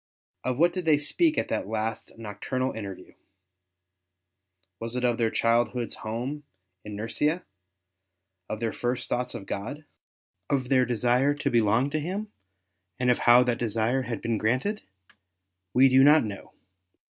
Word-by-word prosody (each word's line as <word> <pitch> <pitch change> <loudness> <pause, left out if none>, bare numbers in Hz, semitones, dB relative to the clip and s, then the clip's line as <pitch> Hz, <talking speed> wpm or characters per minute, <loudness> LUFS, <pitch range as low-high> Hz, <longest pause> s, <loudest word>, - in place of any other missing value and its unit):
Of 130 -1 -1
what 170 +3 +4
did 180 -2 -4
they 155 -2 +5
speak 310 - +1
in - - +1
that - - -2
last 110 +1 -4
nocturnal 115 +4 -3
interview? 100 -4 -8 1.7
Was 115 +1 -5
it 125 - -2
of 120 -1 +1
their 115 -1 +2
childhood's 120 +1 +1
home 120 +7 -4 0.4
in 105 -1 -7
Nursia, 150 - -1 1.1
of 110 - -3
their 115 -1 -2
first 125 0 -2
thoughts 125 0 -2
of 105 -4 -7
God, 140 +12 -5 0.6
of 130 -3 0
their 130 -2 +4
desire 125 +4 +2
to 145 - -1
belong 115 +4 +2
to 155 - 0
Him, 195 +7 -4 0.7
and 125 -1 +3
of 125 - +1
how 120 +1 +6
that 120 -1 -1
desire 115 +3 0
had 120 -2 -5
been 115 -2 0
granted? 130 - 0 0.9
W^e 130 +2 +7
do 130 0 +6
not 150 +2 +7
know. 100 -3 -7
125 Hz, 150 wpm, -27 LUFS, 115-140 Hz, 1.7 s, W^e